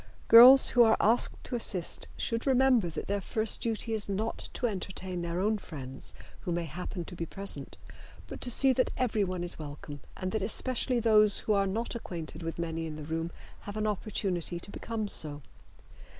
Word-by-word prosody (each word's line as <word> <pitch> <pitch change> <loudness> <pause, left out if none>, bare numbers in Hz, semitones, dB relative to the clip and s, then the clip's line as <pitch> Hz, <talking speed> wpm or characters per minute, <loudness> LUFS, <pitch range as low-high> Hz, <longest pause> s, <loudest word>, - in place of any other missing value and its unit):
Girls 250 +4 +10
who 245 - +3
are 225 -1 +5
asked 230 +4 +2
to 250 - -5
assist 190 -7 -1
should 230 +3 -2
remember 255 -7 +3
that 160 - -6
their 200 0 -2
first 220 +3 -1
duty 225 0 -2
is 215 -2 -1
not 215 +3 -4
to - - -3
entertain 190 -4 -4
their 170 +1 -3
own 210 +2 0
friends 135 -7 -9 0.2
who 175 - -5
may 170 0 -2
happen 175 +3 -6
to 180 - -10
be 165 -1 -5
present, 195 +3 +1 0.5
but - - -9
to 250 - 0
see 265 +2 +5
that 255 0 +1
everyone 200 -7 -1
is 175 -1 -2
welcome 145 -1 -8 0.2
and 185 0 -4
that 220 - -2
especially 245 +4 0
those 215 -3 +5
who 215 - 0
are 200 -1 +1
not 225 +5 -3
acquainted 170 -8 -7
with 165 0 -5
many 165 -1 -4
in 155 - -7
the 155 - -8
room 165 +1 -3 0.4
have 205 - -6
an 215 - -1
opportunity 190 -5 -2
to 195 - -8
become 220 -1 -4
so. 150 -6 -1
200 Hz, 190 wpm, -29 LUFS, 170-225 Hz, 0.5 s, Girls